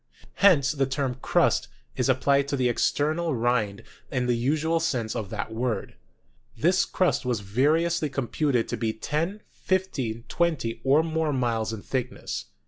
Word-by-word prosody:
Hence 155 -9 +6
the 140 -3 0
term 135 -2 -2
"crust" - - +2 0.3
is 130 0 0
ap 130 0 +2
plied 140 0 +3
to 140 0 -1
the 125 -1 +2
external 155 +6 +1
rind 115 -3 0 0.3
in 125 -2 -1
the 125 - +2
usual 155 +7 +1
sense 125 -9 -1
of 105 -4 -4
that 110 +1 -4
word. 115 -2 -2 0.6
This 175 - +3
crust 185 -5 +1
was 125 -5 -1
variously 150 - +1
computed 135 -1 0
to - - -2
be 110 -2 -1
ten, 165 - -2
fifteen, 135 -12 -2
twen 170 -2 +1
ty, 115 -2 -4
or 140 +4 +4
more 160 -1 0
miles 115 -4 0
in 110 -3 -6
thickness. 125 -1 -3
135 Hz, 160 wpm, -26 LUFS, 115-155 Hz, 0.6 s, Hence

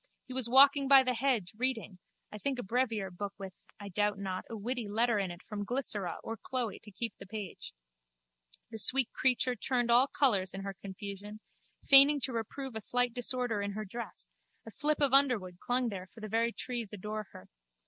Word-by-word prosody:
He 255 - -7
was 255 -2 0
walking 275 +2 +6
by 270 -1 +8
the 255 -1 0
hedge, 235 -7 -1
reading, 225 -6 -3 0.3
I 210 - -8
think 275 +3 -2
a 245 - -4
brevier 225 -3 -1
book 200 +3 -6
with, 195 -2 -8 0.3
I 205 -1 -8
doubt 205 +1 0
not, 190 -2 -5
a 225 - -6
witty 235 +1 -4
letter 230 +1 +1
in 195 -2 -2
it 175 +1 -10
from 205 -1 -5
Glycera 210 -6 -2
or 225 0 -5
Chloe 245 -4 -3
to 210 - -15
keep 230 +4 -3
the 195 - -11
page. 205 -2 -7 1.0
The 220 - -2
sweet 260 +3 +4
creature 255 -1 +1
turned 245 +1 -1
all 245 +3 +5
colours 200 -11 +2
in 195 - -5
her 195 0 -5
confusion, 200 +2 -8 0.5
feigning 280 +1 +9
to 255 - +2
reprove 235 +3 -5
a 220 - -3
slight 245 +2 0
disorder 245 -3 0
in 200 0 -3
her 215 +1 -5
dress: 235 +4 -8 0.3
a - - -9
slip 300 0 0
of 275 -2 +3
underwood 230 -11 +3
clung 245 0 +1
there 190 -3 -7
for 225 - -16
the 215 - -6
very 230 +2 0
trees 235 -3 -4
adore 210 +1 -6
her. 95 - -13
225 Hz, 200 wpm, -31 LUFS, 200-255 Hz, 1.0 s, feigning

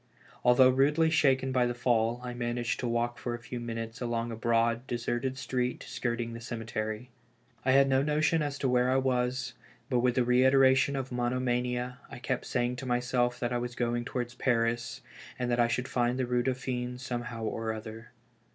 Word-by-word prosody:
Although 125 +1 +6
rudely 150 +5 +3
shaken 135 -4 +3
by 125 -1 +2
the 120 - -2
fall, 120 -1 +1
I 125 -1 -4
managed 120 -1 -2
to 125 - -2
walk 120 0 -1
for 120 -1 -3
a - - -8
few 120 +1 -6
minutes 115 0 -5
along 120 -1 -2
a - - -4
broad, 115 +1 +1
deserted 120 +2 -2
street 125 -1 -2
skirting 120 -1 -2
the 115 - -7
cemetery. 115 0 -4 0.5
I 130 - +3
had 135 0 +6
no 135 0 +3
notion 155 +2 +2
as 145 -2 -2
to 135 - 0
where 125 0 +3
I 130 - +2
was, 125 -1 0 0.4
but 125 - +3
with 125 0 +2
the 125 - +3
reitera 130 +2 +5
tion 140 +1 +1
of 135 -1 -4
monomania, 125 0 -1
I - - -8
kept 125 0 -3
saying 125 0 0
to 130 - -6
mj 125 0 +1
self 125 -1 0
that 120 0 -1
I 120 - +1
was 120 0 -4
going 120 0 -1
towards 120 -1 -4
Paris, 120 -2 0 0.4
and 125 -1 -1
that 120 - +1
I 120 - +5
should 125 +2 -1
find 125 -1 0
the 130 - 0
Eue 125 0 +1
Dauphine 125 -1 -2
somehow 120 -2 -5
or 110 0 -2
other. 110 +1 -8
125 Hz, 195 wpm, -30 LUFS, 120-130 Hz, 0.5 s, Although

